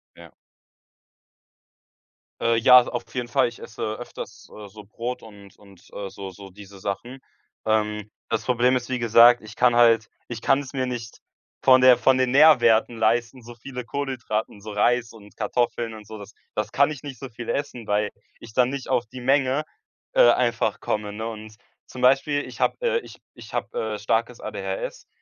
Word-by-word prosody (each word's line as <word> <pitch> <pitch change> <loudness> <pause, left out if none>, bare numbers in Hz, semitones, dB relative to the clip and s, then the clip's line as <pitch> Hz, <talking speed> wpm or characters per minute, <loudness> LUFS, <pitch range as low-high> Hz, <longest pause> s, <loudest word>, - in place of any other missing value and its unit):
Ja. - - -14 2.1
Äh, 115 0 +2
ja, 125 +2 +8
auf 120 - -4
jeden 120 -1 -2
Fall, 135 0 +3
ich 120 - -10
esse 110 - -10
öfters, 120 - -10
äh, 105 -1 -10
so 105 +1 -13
Brot 115 +4 -6
und 100 -3 -15
und, 100 -3 -19
äh, 100 -1 -6
so 95 0 -8
so 95 +1 -12
diese 100 0 -14
Sachen. 110 +7 -5 0.5
Ähm, 105 -1 0 0.2
das 115 -1 -1
Problem 125 +2 +2
ist, 125 0 -3
wie 130 - -1
gesagt, 120 +1 +6
ich 110 +1 -12
kann 120 -1 +3
halt 115 -2 +4 0.2
ich 120 -1 -7
kann 135 +1 +3
es 140 0 -8
mir 130 -1 -1
nicht 120 -3 -6 0.4
von 130 -1 +6
der 130 -1 +7
von 130 -1 +3
den 130 -1 +1
Nährwerten 120 -6 +5
leisten, 115 +3 0
so 120 +1 -12
viele 125 +1 -8
Kohlenhydrate 130 -6 -3
und 100 - -14
so 105 0 -8
Reis 120 +3 +1
und 105 -2 -16
Kartoffeln 120 -2 -1
und 105 -1 -11
so, 110 - -9
das 105 +1 -12 0.2
das 105 - -2
kann 140 +2 +3
ich 145 - -8
nicht 140 -3 -8
so 135 - -7
viel 115 0 -9
essen, 125 -5 -4
weil 105 0 +1 0.3
ich 115 - -12
dann 125 0 +3
nicht 140 -1 -6
auf 120 - +1
die 130 +2 -10
Menge, 135 +2 +2 0.5
äh, 120 - +6
einfach 120 -3 +1
komme, 105 -1 -3
ne? 110 +2 -5
Und 110 -1 -9 0.3
zum 125 - -10
Beispiel 135 +3 +3
ich - - -11
habe - - +2
äh, 480 -1 +1
ich - - -13 0.2
ich - - -13
hab, - - -3
äh, 480 - -3
starkes - - -1
ADHS - - -5
120 Hz, 190 wpm, -24 LUFS, 110-130 Hz, 2.1 s, ja